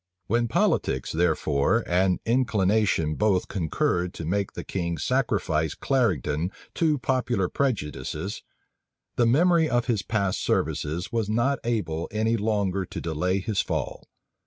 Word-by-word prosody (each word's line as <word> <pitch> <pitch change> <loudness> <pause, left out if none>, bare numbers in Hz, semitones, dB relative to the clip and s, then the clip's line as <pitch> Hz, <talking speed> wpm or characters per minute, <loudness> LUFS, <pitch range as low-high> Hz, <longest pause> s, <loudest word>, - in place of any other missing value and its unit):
When 120 +4 +1
politics, 65 - +1
therefore, 80 +4 +1
and 90 +1 +2
inclination 105 -8 +2
both 100 +1 +1
concurred 90 0 -1
to 80 - -5
make 100 +4 -1
the - - -6
king 85 -3 -3
sacrifice 95 - 0
Clarendon 90 - 0 0.2
to 155 -3 +2
popular 125 -6 0
prejudices, 95 - -2 0.7
the 120 - +3
memory 165 +5 +4
of 120 -1 +1
his 115 -5 0
past 100 -3 -1
services 80 +4 -1
was 115 -3 -1
not 120 +5 +1
able 85 -9 -1
any 110 +2 +1
longer 100 -3 0
to - - -7
delay 90 +4 -1
his 100 0 0
fall. - - -4
100 Hz, 130 wpm, -26 LUFS, 85-115 Hz, 0.7 s, memory